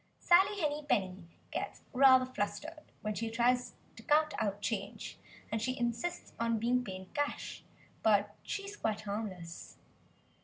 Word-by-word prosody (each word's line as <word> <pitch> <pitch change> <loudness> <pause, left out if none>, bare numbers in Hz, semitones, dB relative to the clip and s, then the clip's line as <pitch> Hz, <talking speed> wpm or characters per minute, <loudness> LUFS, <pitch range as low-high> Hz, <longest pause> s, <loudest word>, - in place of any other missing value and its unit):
Sally 390 +4 +5
Henny 300 -2 0
Penny 185 -3 0 0.2
gets - - -4
rather 260 -1 +7
flustered 300 +7 -4
when 215 0 -1
she 225 +2 -2
tries 245 +2 +2 0.2
to - - -11
count 305 +1 +3
out 205 -1 0
change, 205 -2 -4 0.3
and 220 - 0
she 255 +3 -1
insists 240 +8 -2
on 230 0 +2
being 245 +3 +2
paid 190 -3 -8
cash; 290 0 -2 0.4
but 205 -1 +3
she 400 - -4
is 400 +1 -7
quite 220 - -1
harmless. 200 -5 -5
230 Hz, 145 wpm, -33 LUFS, 205-290 Hz, 0.4 s, rather